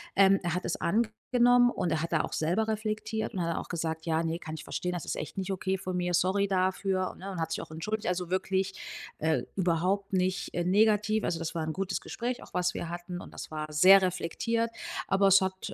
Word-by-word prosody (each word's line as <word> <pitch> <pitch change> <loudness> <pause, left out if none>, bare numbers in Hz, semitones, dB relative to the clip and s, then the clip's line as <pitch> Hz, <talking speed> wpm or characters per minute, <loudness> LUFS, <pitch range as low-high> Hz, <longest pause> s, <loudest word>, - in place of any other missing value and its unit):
ähm, 195 0 +6
er 175 -1 -1
hat 180 - -2
es - - -2
angenommen 240 +4 +3
und 175 - -1
er 160 -1 +1
hat 170 0 -3
da 160 - +4
auch - - -5
selber 180 +8 0
reflektiert. 220 0 -2
Und 185 - -3
dann 170 - 0
hat 165 - -1
er - - 0
auch - - -7
gesagt: 160 -1 -3
„Ja, 165 0 +1
ne, 165 +1 -2
kann 155 0 -6
ich - - -8
verstehen, 180 0 -3
das 175 - -4
ist - - -3
echt 155 - -6
nicht 190 0 -2
okay 190 0 -1
von 185 -1 -4
mir, 175 0 -1
sorry 190 +3 +2
dafür, 185 0 0
ne?“ 195 +2 -8
Und 180 -4 -4
hat 160 0 -2
sich - - -2
auch - - -10
entschuldigt, 210 +7 -3
also 180 -1 -1
wirklich, 190 +1 0 0.5
äh, 160 0 +1
überhaupt 190 +3 +1
nicht, 185 +1 0
äh, 175 - 0
negativ. 210 +3 +3
Also 170 - 0
das 165 +1 -4
war 165 -1 -2
'n 160 - -2
gutes 195 +2 -2
Gespräch 245 +1 -4
auch, - - -16
was 180 0 +1
wir 170 - -4
hatten. 175 +1 -6
Und - - -11
das - - -8
war 155 0 -4
sehr 190 +5 +8
reflektiert. 225 +6 -1 0.4
Aber 195 0 +4
es 195 0 +7
hat 190 0 -3
185 Hz, 240 wpm, -29 LUFS, 170-200 Hz, 0.5 s, sehr